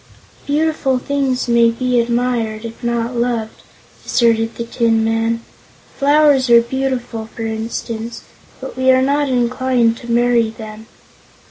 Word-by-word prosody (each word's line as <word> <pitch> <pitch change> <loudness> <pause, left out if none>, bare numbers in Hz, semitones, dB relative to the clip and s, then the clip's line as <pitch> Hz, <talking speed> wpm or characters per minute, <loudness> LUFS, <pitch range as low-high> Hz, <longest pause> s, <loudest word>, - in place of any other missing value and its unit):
"Beautiful 295 -3 +1
things 265 -1 -1
may 235 -1 +4
be 250 +1 0
admired, 235 -2 -1
if 230 +2 -9
not 235 +1 -1
loved," 235 -2 -2 0.4
asserted 230 -1 +1
the 235 - -4
Tin 230 -1 +1
Man. 225 +1 0 0.6
"Flowers 285 -2 +4
are 235 0 +8
beautiful, 245 -2 -3
for 225 - -5
instance, 225 +1 -5 0.4
but - - -8
we 260 0 +1
are 260 0 +5
not 285 +1 +1
inclined 245 -1 +1
to 235 0 -7
marry 240 -1 +3
them. 220 -1 -10
235 Hz, 130 wpm, -17 LUFS, 230-260 Hz, 0.6 s, are